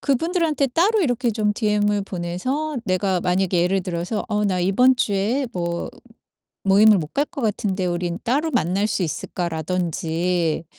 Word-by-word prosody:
그분들한테 310 0 +1
따로 380 - +2
이렇게 245 -6 +1
좀 210 -1 0
DM을 210 -2 +1
보내서 200 - -3
내가 185 -2 0
만약에 180 -1 +1
예를 190 +2 +1
들어서 180 +4 -3
"어 210 -1 0
나 185 -3 0
이번 250 +8 +4
주에 220 +6 0
뭐 170 -1 -3 0.8
모임을 205 +2 +6
못 155 -3 -5
갈 285 - +2
것 305 -3 -8
같은데 205 -4 -1
우린 175 0 -2
따로 285 +7 +1
만날 200 - +1
수 190 - -1
있을까?" 175 +2 -3
라든지 165 0 -1
195 Hz, 310 characters per minute, -22 LUFS, 180-245 Hz, 0.8 s, 모임을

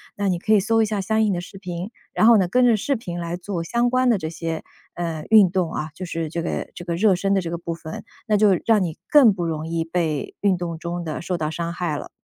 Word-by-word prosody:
那 200 0 -1
你 180 -2 +1
可 215 +5 +1
以 210 - +6
搜 225 +3 +2
一 - - +2
下 210 -2 -2
相 220 +3 +1
应 210 -2 +2
的 175 - -2
视 190 +2 -11
频， 180 0 -5 0.2
然 220 - +4
后 230 -1 +8
呢， 190 -3 +2
跟 250 +8 +3
着 235 -3 +4
视 275 +7 0
频 175 -7 -6
来 170 0 -3
做 175 -1 -4
相 235 +7 +1
关 255 +1 +2
的 230 - +4
这 160 - -4
些， 165 -1 -4 0.3
呃， 165 -3 -4
运 210 -4 +7
动 175 -2 -1
啊， 155 - -3
就 185 - -6
是 165 -2 -3
这 170 +1 -3
个 - - -3
这 175 - -8
个 170 - -2
热 195 +2 +4
身 195 +2 0
的 195 - +2
这 170 - -5
个 170 - -3
部 170 0 -4
分， 160 -1 -8 0.2
那 210 -1 +3
就 210 0 +5 0.2
让 220 -4 +4
你 165 -3 -4
更 270 -8 +7
不 175 -2 -3
容 160 -1 -3
易 165 0 -1
被 165 -3 -2
运 200 -2 +3
动 170 -2 -4
中 175 +1 -4
的 155 -2 -4
受 180 0 -2
到 155 -1 -1
伤 170 +1 -3
害 170 -4 -2
了。 - - -8
175 Hz, 300 characters per minute, -22 LUFS, 165-210 Hz, 0.3 s, 后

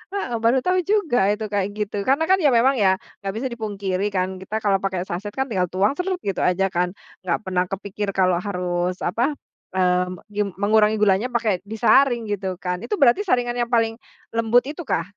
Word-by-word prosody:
Heeh 245 -12 -2
baru 235 +3 +3
tahu 365 0 +2
juga 320 - +2
itu 215 +1 -2
kayak 200 -1 0
gitu 210 -1 -3
karena 280 +4 +3
kan 380 0 +5
ya 295 -4 +4
memang 265 +4 +4
ya, 190 -2 +4 0.2
nggak 195 -1 -4
bisa 260 +4 -2
dipungkiri 205 -4 -2
kan 185 0 -1
kita 190 +3 -6
kalau 195 -2 +2
pakai 190 -2 -2
saset 190 +3 -5
kan 265 0 0
tinggal 180 -3 +1
tuang 190 +6 +1
sret, 370 +1 -1
gitu 195 - -2
aja 190 +1 +1
kan 180 +1 -1 0.3
nggak 175 -2 0
pernah 185 -1 0
kepikir 200 +1 -4
kalau 185 -2 +3
harus 180 -2 -2
apa, 240 +11 0 0.4
eee, 180 -1 +2 0.2
gim 205 0 -1
mengurangi 210 +2 +3
gulanya 210 +3 +3
pakai 225 -7 0
disaring 235 +2 +3
gitu 190 -2 -2
kan, 180 0 -2
itu 420 - -2
berarti 280 +5 +4
saringan 245 -3 +1
yang 240 - 0
paling 225 -1 +2 0.4
lembut 230 +2 +3
itukah? 300 - -2
205 Hz, 190 wpm, -22 LUFS, 185-240 Hz, 0.4 s, kan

